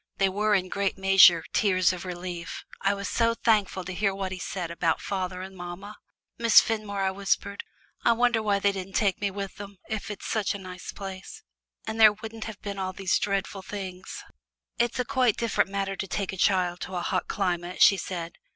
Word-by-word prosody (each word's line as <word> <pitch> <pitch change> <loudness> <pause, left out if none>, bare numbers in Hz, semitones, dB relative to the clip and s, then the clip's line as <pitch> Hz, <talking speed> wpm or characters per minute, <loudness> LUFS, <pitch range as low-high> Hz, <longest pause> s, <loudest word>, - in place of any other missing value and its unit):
They 195 -1 +3
were 210 +2 +2
in 185 -1 0
great 200 +1 -1
measure 190 -3 +7
tears 185 -3 +3
of 180 0 -7
relief 175 -1 -6 0.2
I 195 +1 +2
was 200 0 -4
so 230 -1 +1
thankful 210 -5 +1
to 185 +1 -6
hear 195 +1 0
what 190 -1 -3
he 185 - -5
said 180 -2 -4
about 170 -1 0
father 185 -2 -3
and 190 0 -9
mamma. 180 +4 -8 0.4
"Miss 230 -1 +8
Fenmore," 210 -3 -2
I 190 - +1
whispered, 200 +1 -1 0.4
"I 235 - +5
wonder 240 -1 +2
why 205 -2 +2
they 200 0 +2
didn't 190 -1 -7
take 200 -3 +1
me 200 - +1
with 195 0 -6
them, 200 -1 -9
if 215 -2 -4
it's 210 - -5
a 205 -2 0
nice 185 -2 -8
place. 195 -1 -8 0.4
And 220 - -4
then - - +6
there 215 -1 +9
wouldn't 220 +1 -8
have 220 -3 -7
been 200 -1 -5
all 185 0 -2
these 190 -1 +1
dreadful 200 -1 -2
things." 190 -2 -7 0.6
"It 235 0 +1
is 250 - +1
quite 255 -5 +2
a - - -33
different 230 -4 +1
matter 195 0 -2
to 195 - -4
take 195 0 -3
a - - -4
child 180 -2 +2
to 185 - -6
a 175 - -1
hot 185 0 -1
climate," 180 -2 0
she 195 - +7
said. 170 -3 -5
195 Hz, 210 wpm, -27 LUFS, 185-205 Hz, 0.6 s, there